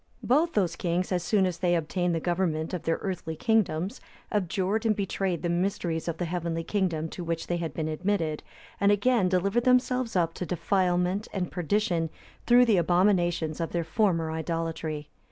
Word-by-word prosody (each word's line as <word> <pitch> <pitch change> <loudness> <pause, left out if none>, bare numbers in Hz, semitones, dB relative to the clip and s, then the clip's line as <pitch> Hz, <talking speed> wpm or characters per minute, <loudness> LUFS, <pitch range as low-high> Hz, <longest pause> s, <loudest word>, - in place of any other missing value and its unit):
Both 310 +7 +2
those 180 -5 +1
kings,(284) 175 +1 -1
as 175 - -5
soon 195 +3 +2
as 180 -2 -2
they 175 -1 +2
obtained 175 +2 0
the - - 0
government 170 -2 -1
of 180 - -2
their 165 - 0
earthly 180 -4 -3
kingdoms, 200 - 0 0.3
abjured 200 +2 0
and 220 -2 +2
betrayed 195 -3 -2
the - - +1
mysteries 175 -2 -1
of 165 -1 -2
the 175 - -2
heavenly 170 -1 -2
kingdom 170 -5 -1
to 175 - -6
which 165 -1 -2
they 175 - -1
had 170 -2 -3
been 160 -1 -3
admitted, 160 -1 -1 0.4
and 200 0 +4
again 205 -1 +3
delivered 200 +6 +1
themselves 250 -2 +2
up 165 -2 +2
to - - -5
defilement 180 +3 0
and 180 -3 -2
perdition 175 -1 0 0.4
through 245 +1 +7
the 220 -5 +3
abominations 175 -2 +2
of 165 - -3
their 170 -1 0
former 165 -2 +1
idolatry. 160 -2 -3
180 Hz, 175 wpm, -27 LUFS, 165-200 Hz, 0.4 s, through